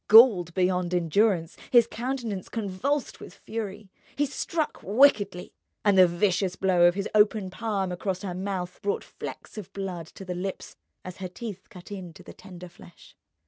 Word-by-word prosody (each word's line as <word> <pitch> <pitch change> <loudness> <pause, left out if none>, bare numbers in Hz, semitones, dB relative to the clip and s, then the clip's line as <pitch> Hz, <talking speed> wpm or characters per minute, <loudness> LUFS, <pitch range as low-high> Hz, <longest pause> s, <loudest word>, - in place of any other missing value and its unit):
Galled 205 -7 +7
beyond 180 -1 +1
endurance, 175 0 +2
his 240 -2 +6
countenance 235 -4 -4
convulsed 230 +7 -2
with 180 - -11
fury, 210 -2 -6 0.2
he 290 - +2
struck 305 +2 -3
wickedly; 205 - +3 0.3
and 205 -1 +5
the 185 -1 +8
vicious 185 +1 +1
blow 180 -2 +4
of 175 - +2
his 200 0 -2
open 210 -2 +3
palm 200 -3 -2
across 185 +1 -3
her 185 -3 -3
mouth 185 -1 -4
brought 200 -1 -1
flecks - - -8
of 200 - -10
blood 185 -4 -5
to 195 - -11
the 180 - -3
lips 185 +2 -5 0.3
as 185 -1 -7
her 185 -1 -5
teeth 195 0 -8
cut 180 +1 -13
into 180 -5 -8
the - - -11
tender 180 -2 -11
flesh. 175 -1 -17
190 Hz, 165 wpm, -27 LUFS, 180-215 Hz, 0.3 s, the